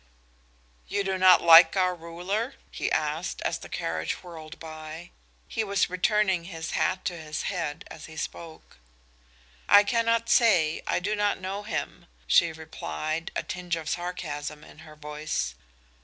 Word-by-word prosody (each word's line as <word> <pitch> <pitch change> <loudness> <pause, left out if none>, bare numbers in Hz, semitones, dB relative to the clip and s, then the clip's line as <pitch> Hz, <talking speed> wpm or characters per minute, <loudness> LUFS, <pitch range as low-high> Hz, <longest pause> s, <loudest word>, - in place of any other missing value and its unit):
"You 200 0 -1
do 190 -1 -1
not 185 -1 +7
like 165 +2 +9
our 185 -1 +3
ruler?" 180 +9 -4 0.2
he - - -2
said, 155 +3 -1
as - - -1
the - - -11
carriage 80 -1 -3
whirled 165 -2 -10
by. 155 +1 -9 0.4
He 225 - -2
was 200 -3 0
returning 190 -2 +2
his 165 -3 -6
hat 185 0 0
to 180 - -1
his 155 -2 -5
head 165 -5 -3
as 155 - -10
he 160 - -12
spoke. 160 - -7 0.9
"I 205 0 +9
cannot 230 +1 +1
say. 175 -11 +4
I - - +1
do 205 +4 -1
not 205 -1 +1
know 190 +2 -4
him," 195 -4 -5 0.2
she 170 - +4
replied, 160 +1 -4
a - - -1
tinge 180 -2 -3
of 160 -2 -6
sarcasm 150 -4 -4
in - - -15
her 155 -1 -13
voice. 150 - -3
170 Hz, 155 wpm, -27 LUFS, 155-190 Hz, 0.9 s, like